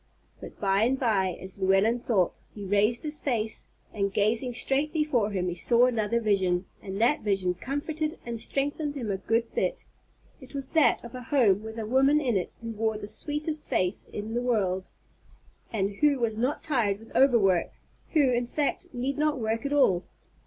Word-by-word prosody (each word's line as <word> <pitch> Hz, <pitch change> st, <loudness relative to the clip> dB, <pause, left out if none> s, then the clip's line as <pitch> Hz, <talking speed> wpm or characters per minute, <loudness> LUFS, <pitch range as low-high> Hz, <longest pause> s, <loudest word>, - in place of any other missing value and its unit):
But, -, -, -11 dB
by 195 Hz, 0 st, +2 dB
and 255 Hz, +4 st, +2 dB
by, 195 Hz, -7 st, +1 dB
as 190 Hz, +1 st, -8 dB
Llewellyn 195 Hz, +5 st, +3 dB
thought, 210 Hz, -7 st, +1 dB, 0.2 s
he 205 Hz, -2 st, -7 dB
raised 205 Hz, +4 st, +2 dB
his 300 Hz, -1 st, -3 dB
face, 225 Hz, -5 st, -2 dB, 0.3 s
and, 200 Hz, -2 st, -1 dB
gazing 225 Hz, +5 st, +1 dB
straight 275 Hz, +4 st, +1 dB
before 300 Hz, -10 st, +1 dB
him, 185 Hz, -3 st, -2 dB
he 175 Hz, -, -1 dB
saw 235 Hz, +7 st, +4 dB
another 235 Hz, -2 st, +1 dB
vision, 190 Hz, -4 st, +1 dB, 0.2 s
and 195 Hz, 0 st, -6 dB
that 245 Hz, +7 st, +3 dB
vision 195 Hz, -3 st, +1 dB
comforted 305 Hz, -, -3 dB
and 235 Hz, -1 st, -4 dB
strengthened 285 Hz, +4 st, -2 dB
him 235 Hz, -7 st, -3 dB
a 195 Hz, -, -1 dB
good 230 Hz, +4 st, -1 dB
bit. -, -, -1 dB, 0.5 s
It 265 Hz, +1 st, -13 dB
was 275 Hz, -1 st, -3 dB
that 315 Hz, -6 st, +3 dB
of 235 Hz, -, -10 dB
a 255 Hz, -, -6 dB
home, 230 Hz, -7 st, +3 dB
with 220 Hz, +1 st, -8 dB
a 225 Hz, -, -3 dB
woman 270 Hz, +6 st, +4 dB
in 255 Hz, -7 st, 0 dB
it 180 Hz, -3 st, -1 dB
who 230 Hz, -, -4 dB
wore 220 Hz, 0 st, -1 dB
the 205 Hz, -1 st, -7 dB
sweetest 300 Hz, +5 st, -2 dB
face 180 Hz, 0 st, 0 dB
in 210 Hz, +2 st, -6 dB
the 240 Hz, -, 0 dB
world, 195 Hz, -7 st, 0 dB, 0.8 s
and 200 Hz, -3 st, 0 dB
who 295 Hz, -2 st, +3 dB
was 230 Hz, -3 st, -1 dB
not 250 Hz, +6 st, -1 dB
tired 230 Hz, -9 st, +1 dB
with 225 Hz, +2 st, -16 dB
overwork, 215 Hz, -10 st, +4 dB, 0.4 s
who, 290 Hz, -5 st, +4 dB
in 240 Hz, 0 st, 0 dB
fact, 290 Hz, +3 st, -2 dB
need 265 Hz, +4 st, -2 dB
not 300 Hz, -1 st, +1 dB
work 225 Hz, +3 st, -1 dB
at -, -, -6 dB
all. 225 Hz, -12 st, +3 dB
230 Hz, 190 wpm, -27 LUFS, 205-270 Hz, 0.8 s, saw